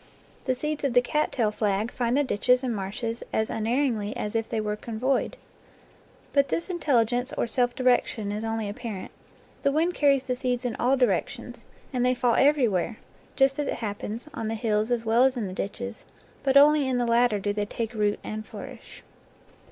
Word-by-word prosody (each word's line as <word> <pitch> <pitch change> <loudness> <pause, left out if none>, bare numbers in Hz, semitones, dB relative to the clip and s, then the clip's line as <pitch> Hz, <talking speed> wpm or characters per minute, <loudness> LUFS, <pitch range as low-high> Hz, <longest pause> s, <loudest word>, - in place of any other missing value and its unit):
The 255 - +1
seeds 300 +3 -2
of 275 -3 +1
the 245 - +7
cat 300 +5 0
tail 225 -5 +1
flag 210 +1 0
find 240 +1 0
the 290 - +3
ditches 250 +1 +2
and 245 -3 -1
marshes 215 +4 -4
as 220 0 0
un 220 - -2
erringly 230 -4 0
as 210 - -3
if 225 -1 -1
they 225 - -1
were 210 -1 -1
convoyed. 235 +5 -1 1.0
But 280 -1 +4
this 335 +6 -2
intelli 290 -10 +2
gence, 245 +3 -2
or - - +1
self 245 +1 0
direction, 245 -5 +1
is 210 +1 -3
only 225 -1 -2
apparent. 205 -1 -6 0.5
The 280 - +2
wind 325 +5 +1
carries 280 -4 +3
the 250 - -2
seeds 250 -1 -2
in 240 - -1
all 260 +3 +2
directions, 250 -1 -1 0.3
and 250 -1 +1
they 250 0 +3
fall 245 -1 +2
every 275 -1 +4
where, 205 +2 -1 0.4
just 270 +1 +3
as 290 - -1
it - - -1
happens, 215 +3 -5
on 225 - -4
the 225 - -2
hills 215 0 0
as 240 -2 0
well 230 +3 +4
as 265 -1 +3
in 225 - -1
the 185 - -5
ditches, 225 +5 -5 0.4
but 270 0 +3
only 290 0 +6
in 255 - +1
the 245 - +1
latter 235 -2 +3
do 205 +1 -1
they 205 0 -1
take 230 +2 -4
root 210 -2 0
and 215 0 -5
flourish. - - -10
240 Hz, 205 wpm, -26 LUFS, 215-260 Hz, 1.0 s, the